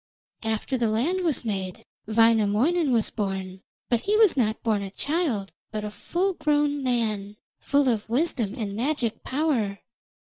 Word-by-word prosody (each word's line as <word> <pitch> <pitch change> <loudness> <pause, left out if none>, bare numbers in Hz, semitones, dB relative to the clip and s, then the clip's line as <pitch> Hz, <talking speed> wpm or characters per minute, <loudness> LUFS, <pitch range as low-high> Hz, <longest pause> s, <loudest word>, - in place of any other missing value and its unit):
After 225 +4 -1
the 230 -2 +2
land 290 +13 +1
was 320 -8 0
made 190 -4 -4 0.2
Wainamoinen 225 +8 +3
was 230 -3 +2
born, 190 -3 -3 0.3
but 240 - +2
he 420 +1 +1
was 435 -4 +5
not 220 -5 0
born 215 -3 +1
a 195 - -4
child, 275 - -1 0.2
but 215 -1 -4
a 210 - -4
full 370 - -1
grown 295 -3 +1
man, 215 -5 -1 0.2
full 280 -1 +2
of 225 -3 0
wisdom 240 -5 0
and 210 -5 -4
magic 240 -1 -1
power. 260 -9 0
230 Hz, 150 wpm, -26 LUFS, 210-290 Hz, 0.3 s, was